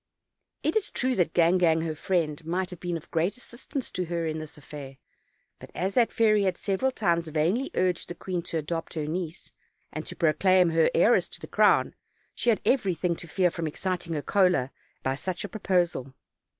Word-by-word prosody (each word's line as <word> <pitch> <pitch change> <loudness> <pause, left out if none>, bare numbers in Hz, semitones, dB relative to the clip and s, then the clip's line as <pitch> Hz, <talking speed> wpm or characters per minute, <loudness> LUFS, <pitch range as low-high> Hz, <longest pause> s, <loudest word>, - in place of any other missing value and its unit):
It 310 - +1
is 425 -2 +1
true 255 +1 0
that 170 -3 +1
Gangan, 170 -1 +4
her 160 - -2
friend, 155 -2 -1
might 180 +3 -2
have 180 - -9
been 175 -1 -2
of 165 - -14
great 170 +7 0
assistance 250 +2 -7
to 180 -1 -2
her 170 0 -2
in 160 0 -2
this 155 -1 -8
affair, 140 -2 -9 0.6
but - - -11
as 190 +2 -1
that 235 0 +3
fairy 215 -2 +3
had 185 -2 0
several 200 +6 0
times 170 -9 0
vainly 165 - 0
urged 180 -2 +1
the 175 - -5
queen 180 -1 -3
to 165 - -1
adopt 165 +2 -4
her 155 -2 -2
niece, 165 +2 -4 0.4
and - - -4
to - - -6
pro 160 -3 +3
claim 185 -2 +4
her 165 0 +4
heiress 225 +8 +4
to - - -12
the - - -8
crown, - - +3 0.4
she 240 - 0
had 220 - +3
everything 185 -8 +1
to 170 - -7
fear 180 +2 +2
from 165 -1 -3
exciting 175 +1 -3
her 150 -2 -2
choler 180 -10 +2 0.3
by 130 0 0
such 180 +5 -4
a - - -3
proposal. 175 - 0
175 Hz, 200 wpm, -27 LUFS, 160-190 Hz, 0.6 s, Gangan